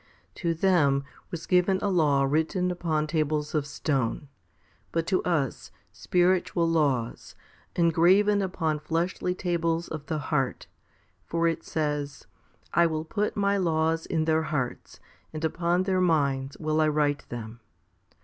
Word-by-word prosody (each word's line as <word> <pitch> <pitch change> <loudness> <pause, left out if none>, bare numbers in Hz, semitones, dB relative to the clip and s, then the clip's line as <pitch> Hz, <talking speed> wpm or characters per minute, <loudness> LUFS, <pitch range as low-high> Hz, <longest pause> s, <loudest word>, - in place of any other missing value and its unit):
3. - - -12
To 170 -3 +1
them 155 -6 +3 0.3
was 170 -1 -6
given 180 +1 +3
a 205 - -1
law 150 -6 +3
written 160 +6 +1
upon 160 -3 -1
tables 150 -1 -1
of 150 -2 0
stone; 140 -2 -2 0.6
but 165 -1 0
to 185 0 +1
us, 155 -8 -1 0.2
spiritual 175 -1 +1
laws, 140 -8 0 0.4
engraven 180 +5 +4
upon 165 -5 -1
fleshy 170 +3 -1
tables 170 -2 -1
of 155 -2 -7
the 155 - -1
heart* 135 -3 -1 0.6
for 170 0 0
it 165 - -1
says, 150 -2 -3 0.5
I 170 0 +5
will 155 -1 -3
put 210 +6 -2
My 200 0 +2
laws 165 -2 0
in 160 -3 0
their 160 0 +2
hearts, 145 -6 -4 0.3
and 155 +1 -3
upon 175 +2 +1
their 185 -1 +1
minds 140 -6 +1
will 155 0 0
I 155 - +4
write 150 -1 0
them? 115 -1 -7
160 Hz, 140 wpm, -27 LUFS, 150-175 Hz, 0.6 s, I